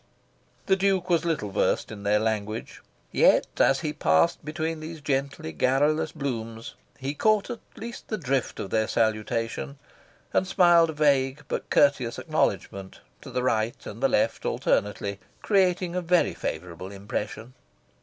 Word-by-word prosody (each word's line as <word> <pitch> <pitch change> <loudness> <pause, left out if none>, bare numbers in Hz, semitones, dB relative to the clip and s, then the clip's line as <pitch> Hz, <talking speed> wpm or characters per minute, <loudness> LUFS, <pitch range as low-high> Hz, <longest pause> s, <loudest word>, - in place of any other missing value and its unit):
The 190 - +4
Duke 190 -2 +1
was 170 -1 +2
little 150 -12 -1
versed - - 0
in 105 -2 -8
their 105 +1 +2
language; 110 0 -3 0.3
yet, - - +5
as 135 +3 +4
he 155 -2 -2
passed 80 - +2
between 160 +1 -3
these 160 +1 -7
gently 140 - -2
garrulous 145 - +1
blooms, 115 -4 -5 0.2
he 135 +1 -3
caught 215 - +2
at 235 - -5 0.2
least 235 +1 -8
the 215 - -2
drift 135 - -1
of 95 - -5
their 110 -1 +1
salutation, 110 - -1 0.6
and 190 - +2
smiled 175 -3 +5
a - - -3
vague 140 -1 +2
but - - -4
courteous 135 -5 +3
acknowledgment, 95 -1 -2 0.2
to - - -10
the 125 - -2
right 115 -2 0
and - - -8
the - - +3
left - - +1
alternately, 100 -1 -1 0.2
creating 180 -3 +2
a 180 - 0
very 175 0 +2
favourable 90 +1 -5
impression. 105 +4 -5
135 Hz, 150 wpm, -26 LUFS, 110-165 Hz, 0.6 s, yet